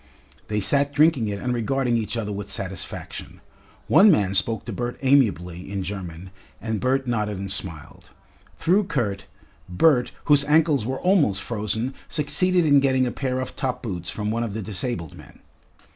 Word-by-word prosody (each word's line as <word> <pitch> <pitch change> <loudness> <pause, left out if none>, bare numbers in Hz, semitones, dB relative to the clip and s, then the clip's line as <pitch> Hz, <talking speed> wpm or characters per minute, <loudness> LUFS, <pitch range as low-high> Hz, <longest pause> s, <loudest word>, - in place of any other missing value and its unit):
They 105 0 -1
sat 140 +7 +2
drinking 145 -7 +3
it 100 -1 -3
and 125 +4 -2
regarding 125 +1 0
each 110 0 -2
other 105 -2 -3
with 100 0 -5
satisfaction. 95 -3 -6 0.5
One 210 +3 +7
man 100 - +3
spoke 110 +3 0
to 115 - -5
Bert 120 +4 -4
amiably 95 -10 +1
in 100 -1 -2
German, 90 -2 -7 0.3
and 110 -2 -3
Bert 130 +3 +1
nodded 105 -4 -1
and 95 0 -5
smiled. 80 -6 -8 0.5
Through 190 +5 +2
Kurt, 100 - -2 0.4
Bert, 125 - +3
whose 145 -1 +5
ankles 150 -5 +3
were 130 +1 -2
almost 160 - +2
frozen, 110 +3 -2
succeeded 175 +4 +2
in 145 -2 +6
getting 130 -1 +2
a 125 - -1
pair 130 -1 -2
of 130 0 -5
top 125 -2 -3
boots 90 -6 -4
from 105 0 -3
one 115 +1 -1
of 110 -3 -3
the 110 - -3
disabled 95 - -4
men. - - -14
115 Hz, 170 wpm, -24 LUFS, 100-135 Hz, 0.5 s, One